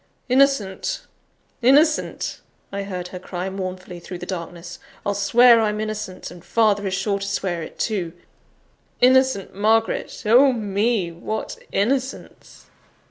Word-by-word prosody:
"Innocent! 255 -7 +1 0.6
innocent!" 295 +6 +2 0.3
I 200 0 -3
heard 180 -3 -5
her 180 - -7
cry 185 0 -5
mournfully 185 -2 -6
through 180 +1 -8
the 180 - -7
darkness. 175 -1 -7 0.3
"I'll 205 - +1
swear 230 +4 +5
I'm 210 -1 0
innocent, 215 -3 -5
and 175 - -13
father 210 -3 +2
is 190 - -1
sure 200 +1 -1
to 200 - -4
swear 190 -4 -2
it 160 - -9
too. 185 -7 -2 0.9
Innocent 260 -5 +3
Margaret! 220 +3 0
Oh, 255 +5 +6
me! 205 -3 0
what 215 +6 -5 0.2
innocence!" 260 +6 -3
200 Hz, 130 wpm, -22 LUFS, 185-230 Hz, 0.9 s, Oh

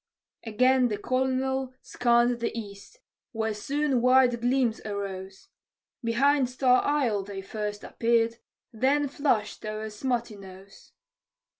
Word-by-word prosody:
Again 255 +3 +3
the 210 -3 -3
colonel 260 +1 -1
scanned 240 0 +2
the 235 - -1
east, 205 - -11 0.3
where 220 -1 -1
soon 275 +4 -1
white 250 -1 +4
gleams 245 -2 +1
arose: 195 -2 -6 0.5
Behind 260 +3 +2
Star 255 0 +3
Isle 255 -9 +1
they 195 0 -7
first 210 0 -5
appeared, 230 0 +1 0.4
then 275 +6 +1
flashed 265 -7 -1
o'er 215 0 -5
Smuttynose. 210 -5 -6
235 Hz, 110 wpm, -27 LUFS, 210-260 Hz, 0.5 s, white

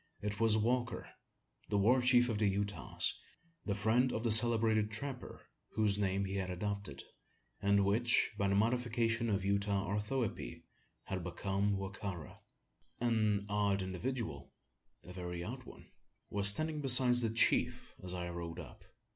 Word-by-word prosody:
It 105 0 -5
was 110 -1 +5
Walker 120 +2 -1 0.6
the 100 - 0
war 120 +6 +3
chief 125 -1 +4
of 110 -4 -2
the 105 - +2
Utahs 100 -2 -2 0.5
the 100 - -1
friend 115 +5 +1
of 110 - -3
the 115 - +1
celebrated 110 -1 +4
trapper, 125 +4 -7 0.3
whose 105 -2 +2
name 100 0 0
he 95 +1 -4
had 95 -1 -3
adopted; 100 -6 -5 0.6
and 100 0 +2
which, 115 +4 +2
by 100 -1 0
the 100 - +1
modification 115 +1 0
of 100 -2 -1
Utah 100 0 0
orthoepy, 105 - -3 0.4
had 95 -2 -5
become 100 +3 -2
Wa 95 0 -4
ka 95 0 -5
ra. 80 -5 -11 0.6
An 110 -4 0
odd 100 -2 0
individual 95 - -5 0.5
a 90 - -11
very 90 -1 -6
odd 125 +5 -7
one - - -14 0.4
was 100 0 +5
standing 155 +7 +2
beside 125 -2 +6
the 120 -2 +1
chief 115 +1 0
as 90 0 -4
I 90 -1 -4
rode 85 -1 -6
up. - - -11
105 Hz, 155 wpm, -34 LUFS, 95-115 Hz, 0.6 s, beside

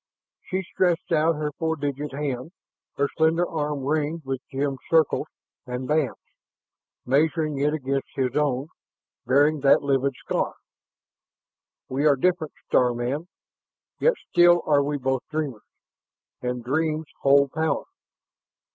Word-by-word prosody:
She 190 +1 -2
stretched 175 -1 0
out 165 0 +3
her 150 0 -2
four 160 -1 0
digit 145 0 -3
hand, 140 +2 -4 0.4
her 140 - +2
slender 160 +2 +3
arm 150 -3 -3
ringed 155 +2 -1
with 135 -1 -3
gemmed 135 -1 -1
circles 160 -3 +3 0.4
and 125 +1 -4
bands, 150 -2 +1 0.9
measuring 150 +2 +1
it 150 0 0
beside 135 +1 0
his 130 -2 -1
own, 145 -1 0 0.6
bearing 145 +4 +4
that 135 +1 +4
livid 135 -1 +1
scar. - - -2 1.3
"We 140 +4 +1
are 145 - +5
different, 165 +1 0
star 125 -1 +3
man, 130 +8 -2 0.7
yet 485 - +3 0.2
still 175 0 +6
are 145 -2 +4
we 145 +1 -1
both 130 -1 -1
dreamers. 150 -8 -3 0.8
And 125 -1 -3
dreams 155 +4 0 0.2
hold 140 0 +5
power. 160 0 0
145 Hz, 130 wpm, -25 LUFS, 135-160 Hz, 1.3 s, still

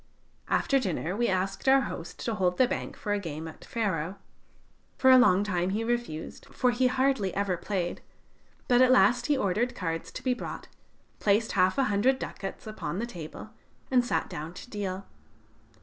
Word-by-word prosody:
After 275 - +2
dinner 180 - -2
we 235 +2 +1
asked 195 +6 0
our 270 0 +6
host 170 -9 -6
to 230 - 0
hold 180 -3 +1
the 255 - +5
bank - - -4
for 205 - -2
a 205 - 0
game 160 -3 -6
at 160 - -11
faro. 190 -6 -2 0.8
For 260 - +6
a 260 - +9
long 200 -6 +5
time 180 -3 0
he 210 +4 -1
refused, 235 -9 -3
for 250 - +1
he 255 +1 +2
hardly 260 -6 +1
ever 200 -2 0
played, 175 -1 -3 0.7
but 245 -1 +5
at 255 - +6
last 245 +1 +4
he 290 - +2
ordered 230 +2 0
cards 165 -3 -3
to - - -7
be 255 - +2
brought, 245 - -7 0.5
placed 210 +2 +2
half 185 +3 +2
a 275 - +4
hundred 230 +4 +2
ducats 195 -6 -6
upon 215 -4 -5
the 230 - -1
table, 175 0 -9 0.4
and 250 -1 +4
sat 245 - -1
down 155 +4 -7
to - - -10
deal. 195 -2 -4
205 Hz, 180 wpm, -28 LUFS, 185-245 Hz, 0.8 s, a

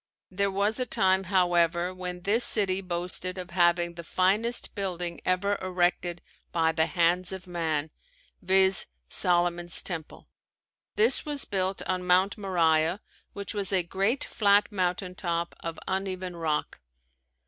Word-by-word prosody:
There 200 +2 0
was 200 +4 0
a 255 - 0
time, 190 -2 +2
however, 175 -1 +2
when 180 -1 -6
this 210 +6 +3
city 195 -3 +4
boasted 180 0 -3
of 180 -1 -7
having 175 -1 +2
the 170 0 -8
finest 205 +8 +1
building 180 -4 -3
ever 200 +2 +1
erected 175 -1 -1 0.3
by 160 -1 +2
the 160 0 +1
hands 180 +1 +1
of 190 0 -7
man, 160 -4 -2 0.5
viz: 190 +1 +3 0.2
Solomon's 175 -1 +1
Temple. 165 -4 -6 0.7
This 445 +2 +2
was 295 -2 +1
built 190 -1 -2
on 185 -1 -2
Mount 185 +2 +3
Moriah 170 -3 +1 0.3
which 200 +1 -5
was 200 -3 -1
a 185 -2 +3
great 195 - 0
flat 205 0 +2
mountain 180 -1 -2
top 170 -2 -3
of 165 -1 -6
uneven 185 -1 -3
rock. 160 -3 -2
185 Hz, 135 wpm, -27 LUFS, 175-195 Hz, 0.7 s, city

